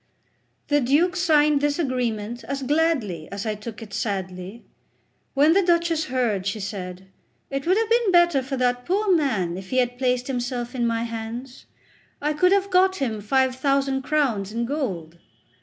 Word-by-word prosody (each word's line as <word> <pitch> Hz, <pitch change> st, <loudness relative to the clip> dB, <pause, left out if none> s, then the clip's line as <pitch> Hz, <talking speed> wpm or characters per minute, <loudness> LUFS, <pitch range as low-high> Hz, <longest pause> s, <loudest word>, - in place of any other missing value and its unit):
The 290 Hz, 0 st, +3 dB
Duke 305 Hz, +8 st, +2 dB
signed 300 Hz, -5 st, +3 dB
this 290 Hz, 0 st, +1 dB
agreement 240 Hz, -6 st, -2 dB
as 275 Hz, +2 st, -4 dB
gladly 260 Hz, -, 0 dB
as 200 Hz, +1 st, -5 dB
I 215 Hz, -, 0 dB
took 215 Hz, +2 st, -8 dB
it 205 Hz, -2 st, -12 dB
sadly. 190 Hz, 0 st, -4 dB, 0.7 s
When 295 Hz, +4 st, +5 dB
the 395 Hz, -, +4 dB
Duchess 340 Hz, -3 st, +1 dB
heard, 230 Hz, -7 st, -1 dB
she 200 Hz, +2 st, -2 dB
said: 190 Hz, -2 st, -6 dB, 0.4 s
"It 275 Hz, +3 st, -3 dB
would 370 Hz, +3 st, +4 dB
have 450 Hz, 0 st, +1 dB
been 470 Hz, -4 st, +3 dB
better 345 Hz, -5 st, +4 dB
for 270 Hz, +1 st, -4 dB
that 245 Hz, 0 st, +1 dB
poor 390 Hz, +4 st, +2 dB
man 210 Hz, -, 0 dB
if 190 Hz, 0 st, -9 dB
he 255 Hz, -, -1 dB
had 245 Hz, -1 st, +1 dB
placed 250 Hz, -1 st, +1 dB
himself 245 Hz, -1 st, -3 dB
in 240 Hz, -2 st, 0 dB
my 230 Hz, 0 st, 0 dB
hands; 235 Hz, +3 st, -7 dB, 0.5 s
I 300 Hz, +1 st, 0 dB
could 360 Hz, +5 st, +3 dB
have 400 Hz, 0 st, +2 dB
got 375 Hz, +1 st, +4 dB
him 230 Hz, -, -2 dB
five 260 Hz, +4 st, +2 dB
thousand 275 Hz, 0 st, +1 dB
crowns 260 Hz, -9 st, 0 dB
in 235 Hz, +2 st, -2 dB
gold." 185 Hz, -, -4 dB
255 Hz, 175 wpm, -24 LUFS, 220-300 Hz, 0.7 s, When